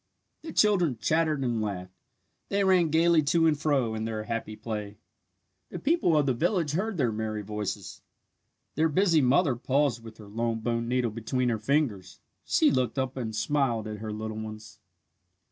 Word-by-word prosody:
The 320 - -7
children 180 - +3
chattered 155 +3 +1
and 120 -3 0
laughed. 95 -3 -4 0.6
They 200 0 +1
ran 185 -4 +4
gaily 165 +1 +4
to 165 +3 +2
and 160 -2 +4
fro 145 -6 0
in 110 0 -3
their 110 -1 -3
happy 115 -1 -4
play. 105 -2 -6 0.7
The - - -6
people 280 - +2
of 150 - +3
the 130 - +2
village 165 - 0
heard 195 +5 -2
their 125 -6 +1
merry 110 -1 -3
voices. 105 0 -5 0.7
Their 160 +2 +2
busy 170 0 +3
mother 135 +2 +3
paused 130 -1 0
with 110 -1 -11
her 105 - -12
long 115 +2 -2
bone 115 0 -1
needle 125 -1 0
between 120 +3 -1
her 115 -2 -1
fingers. 110 -7 -1 0.2
She - - +3
looked 125 -2 0
up 130 0 -1
and 115 -4 -4
smiled 120 -4 0
at 105 -1 -6
her 110 0 -5
little 110 0 -5
ones. 110 0 -9
125 Hz, 175 wpm, -28 LUFS, 110-155 Hz, 0.7 s, ran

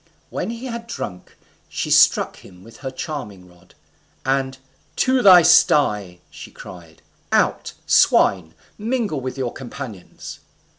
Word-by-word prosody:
When - - -4
he 235 +2 -7
had 235 -2 -6
drunk, 90 - -8 0.3
she - - -4
struck - - +4
him 90 0 -16
with 115 +1 -15
her 135 - -6
charming 125 - -7
rod, 90 -1 -23 0.5
and 135 0 -1 0.4
"To 260 -1 +2
your 185 -5 +8
sty!" 105 - +3
she - - -11
cried; 85 -3 -14 0.3
"out, - - 0
swine! 85 -4 +3 0.2
mingle 220 - -2
with 130 +1 -6
your 130 -3 -3
companions!" 115 -6 -9
130 Hz, 130 wpm, -20 LUFS, -, 0.5 s, your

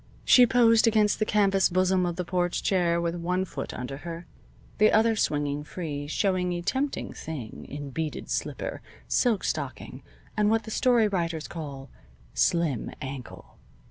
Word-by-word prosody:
She 250 -1 +7
posed 230 -1 +5
against 215 -2 +3
the 215 - 0
canvas 195 -2 +3
bosom 185 0 +2
of 175 - -2
the 180 - -3
porch 175 0 -1
chair 175 -3 +2
with 170 0 -1
one 180 +2 -1
foot 135 -6 -6
under 125 +2 -6
her, 170 +2 -7 0.5
the 215 0 +6
other 225 +1 +4
swinging 145 -6 0
free, 150 -3 -5
showing 180 +2 0
a 175 - -3
tempting 270 +8 -2
thing 140 -9 -7
in 145 0 -6
beaded 155 +3 -4
slipper, - - -3 0.3
silk 235 -5 +2
stocking, - - -4 0.3
and 210 -1 +3
what 225 +1 +2
the 220 - -8
story 240 -2 +3
writers 170 -5 -2
call 140 -5 -7 0.4
"slim 165 -9 +1
ankle." 135 -1 -8
175 Hz, 155 wpm, -27 LUFS, 155-210 Hz, 0.5 s, She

